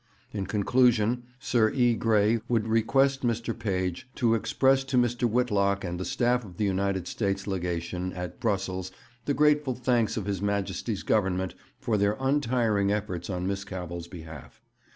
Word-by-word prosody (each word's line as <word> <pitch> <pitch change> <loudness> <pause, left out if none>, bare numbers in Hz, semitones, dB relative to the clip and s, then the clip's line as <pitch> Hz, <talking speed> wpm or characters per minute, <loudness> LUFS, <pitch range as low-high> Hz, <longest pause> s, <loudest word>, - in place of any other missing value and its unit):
'In 100 -3 -4
conclusion, 120 +3 +2
Sir 115 -4 +2
E. 120 -1 +3
Grey 110 0 +2
would 115 -2 +1
request 135 +5 +2
Mr. 115 -1 -1
Page 95 0 -2
to 115 -3 +2
express 135 +4 +2
to 135 -1 -1
Mr. 120 0 +2
Whitlock 100 -4 +1
and 90 -1 -4
the 95 - -3
staff 125 0 +1
of 90 -5 -12
the 105 - +1
United 95 -2 0
States 100 -1 -2
Legation 90 -1 -3
at 90 -1 -6
Brussels 95 -4 -2 0.3
the 145 - 0
grateful 150 -3 +3
thanks 120 -3 +1
of 105 - -2
His 100 -2 -2
Majesty's 100 +1 -2
Government 95 -3 +1 0.3
for 110 -2 0
their 100 +1 +1
untiring 120 -7 +1
efforts 100 -4 -3
on 90 -1 -2
Miss 100 0 -2
Cavell's 90 -3 -6
behalf. 80 -5 -11
105 Hz, 155 wpm, -27 LUFS, 95-120 Hz, 0.3 s, E